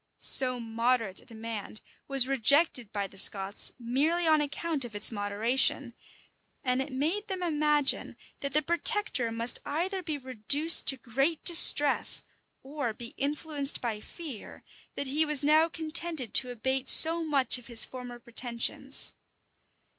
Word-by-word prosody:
So 255 Hz, -2 st, +4 dB
moderate 230 Hz, -3 st, -4 dB
a -, -, -21 dB
demand 220 Hz, -2 st, -10 dB, 0.3 s
was 270 Hz, -2 st, +4 dB
rejected 270 Hz, -2 st, +1 dB
by 200 Hz, -1 st, -5 dB
the 195 Hz, 0 st, -6 dB
Scots 195 Hz, +1 st, +2 dB
merely 285 Hz, +8 st, -3 dB
on 310 Hz, -1 st, +1 dB
account 295 Hz, 0 st, -4 dB
of 235 Hz, -3 st, -11 dB
its 205 Hz, -, +5 dB
moderation; 215 Hz, +5 st, -1 dB, 0.7 s
and 250 Hz, -1 st, -2 dB
it 270 Hz, +2 st, -8 dB
made 320 Hz, +11 st, -4 dB
them 375 Hz, -2 st, -7 dB
imagine 300 Hz, -3 st, -1 dB, 0.2 s
that 280 Hz, -, -5 dB
the 305 Hz, +1 st, +1 dB
protector 340 Hz, -, +1 dB
must 230 Hz, +1 st, -1 dB
either 370 Hz, +5 st, -5 dB
be 315 Hz, -4 st, -7 dB
reduced 270 Hz, +5 st, +2 dB
to 270 Hz, -, +5 dB
great 270 Hz, +6 st, -4 dB
distress, 295 Hz, -4 st, +6 dB, 0.4 s
or 270 Hz, -5 st, -7 dB
be 235 Hz, 0 st, -11 dB
influenced 290 Hz, 0 st, -2 dB
by 225 Hz, -3 st, -6 dB
fear, 295 Hz, -, -12 dB, 0.3 s
that 280 Hz, -, -5 dB
he 290 Hz, +4 st, -1 dB
was 300 Hz, -2 st, +3 dB
now 310 Hz, +3 st, +1 dB
contented 320 Hz, -5 st, -1 dB
to 250 Hz, -, +3 dB
abate 260 Hz, +2 st, -4 dB
so 330 Hz, +1 st, +5 dB
much 275 Hz, -5 st, 0 dB
of 240 Hz, -, -16 dB
his 235 Hz, -2 st, -1 dB
former 250 Hz, -1 st, -12 dB
pretensions. 240 Hz, +3 st, -1 dB
270 Hz, 145 wpm, -26 LUFS, 235-310 Hz, 0.7 s, distress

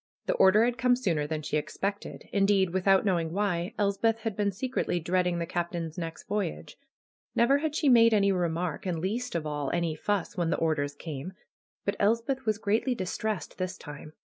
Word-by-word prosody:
The -, -, +1 dB
order 205 Hz, +4 st, +5 dB
had 245 Hz, +1 st, -1 dB
come 250 Hz, 0 st, +4 dB
sooner 170 Hz, -12 st, 0 dB
than 155 Hz, 0 st, -3 dB
she 150 Hz, -, -1 dB
expected. 200 Hz, +6 st, -4 dB
Indeed, 195 Hz, -2 st, +3 dB
without 190 Hz, +2 st, +3 dB
knowing 170 Hz, -5 st, +1 dB
why, 185 Hz, -3 st, -1 dB
Elspeth 220 Hz, +3 st, +1 dB
had 220 Hz, -2 st, -3 dB
been 205 Hz, 0 st, +1 dB
secretly 245 Hz, -3 st, -1 dB
dread 180 Hz, +2 st, +1 dB
ing 175 Hz, -1 st, 0 dB
the 170 Hz, -, -1 dB
Captain's 170 Hz, -1 st, -3 dB
next 165 Hz, -2 st, -6 dB
voyage. 200 Hz, -5 st, -3 dB, 0.6 s
Never 270 Hz, +4 st, +4 dB
had 305 Hz, 0 st, -2 dB
she 305 Hz, -, +1 dB
made 230 Hz, -3 st, +7 dB
any 200 Hz, -2 st, +4 dB
remark, 175 Hz, -1 st, -1 dB
and, 175 Hz, -2 st, -1 dB
least 210 Hz, +7 st, -3 dB
of 165 Hz, -2 st, -1 dB
all, 145 Hz, -2 st, -2 dB
any 170 Hz, -2 st, 0 dB
fuss 200 Hz, +2 st, -2 dB
when 175 Hz, -3 st, 0 dB
the -, -, +1 dB
orders 145 Hz, -3 st, 0 dB
came. 155 Hz, +3 st, -6 dB, 0.5 s
But 200 Hz, -, -1 dB
Elspeth 230 Hz, +5 st, +1 dB
was 215 Hz, -1 st, +2 dB
greatly 220 Hz, +5 st, 0 dB
distressed 190 Hz, -2 st, -3 dB
this 185 Hz, 0 st, -3 dB
time. 150 Hz, +1 st, -10 dB
190 Hz, 190 wpm, -28 LUFS, 165-215 Hz, 0.6 s, made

